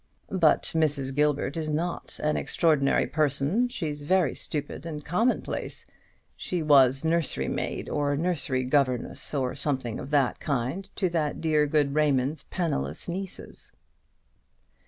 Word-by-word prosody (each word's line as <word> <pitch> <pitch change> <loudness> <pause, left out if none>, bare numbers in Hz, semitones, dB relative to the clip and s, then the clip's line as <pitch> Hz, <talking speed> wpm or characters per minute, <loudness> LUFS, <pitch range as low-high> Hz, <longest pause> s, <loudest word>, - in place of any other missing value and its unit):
"But 170 -5 +3
Mrs. 145 -4 +1
Gilbert 145 -1 +1
is 160 -2 -2
not 165 +3 -3
an 150 0 +2
extraordinary 150 -5 +2
person: 155 - +1
she's 155 -11 -4
very 170 -1 +2
stupid 145 0 -3
and 155 -3 -6
commonplace. 220 +10 -1 0.5
She 175 -3 -3
was 135 -1 +5
nursery 160 - +1
maid, - - -3
or 145 -1 0
nursery 155 -5 0
governess, 130 -2 0
or 130 -4 -1
something 135 -5 -2
of 135 - -7
that 140 -4 +2
kind, 140 +8 -2
to 190 - +1
that 160 -3 -1
dear 155 -2 +2
good 145 -2 +2
Raymond's 145 -1 +2
penniless 80 - -3
nieces." 190 +2 -5
150 Hz, 130 wpm, -27 LUFS, 140-165 Hz, 0.5 s, was